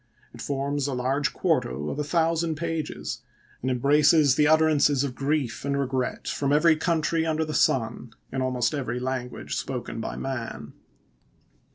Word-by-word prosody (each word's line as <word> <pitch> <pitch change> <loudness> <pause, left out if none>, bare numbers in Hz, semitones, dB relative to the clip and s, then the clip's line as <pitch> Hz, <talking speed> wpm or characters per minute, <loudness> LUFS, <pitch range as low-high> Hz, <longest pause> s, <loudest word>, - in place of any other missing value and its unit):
It 120 - -10
forms 140 0 -1
a 135 - -2
large 135 +3 0
quarto 70 +4 -1
of 145 - -5
a - - 0
thousand 165 +1 +1
pages, 165 -1 -4 0.4
and 130 - -1
embraces 145 +3 +4
the 150 +1 +3
utterances 155 -3 +4
of 140 -3 -3
grief 140 -2 -1
and 140 0 -1
regret 130 -2 -2
from 140 -1 -1
every 160 +2 +5
country 160 0 0
under 160 0 0
the 155 - -5
sun, 115 -3 +1 0.2
in 130 - -2
almost 125 0 0
every 130 -4 -2
language 125 -1 -4
spoken 125 -3 -4
by - - -4
man. 130 -3 -5
140 Hz, 155 wpm, -26 LUFS, 130-155 Hz, 0.4 s, every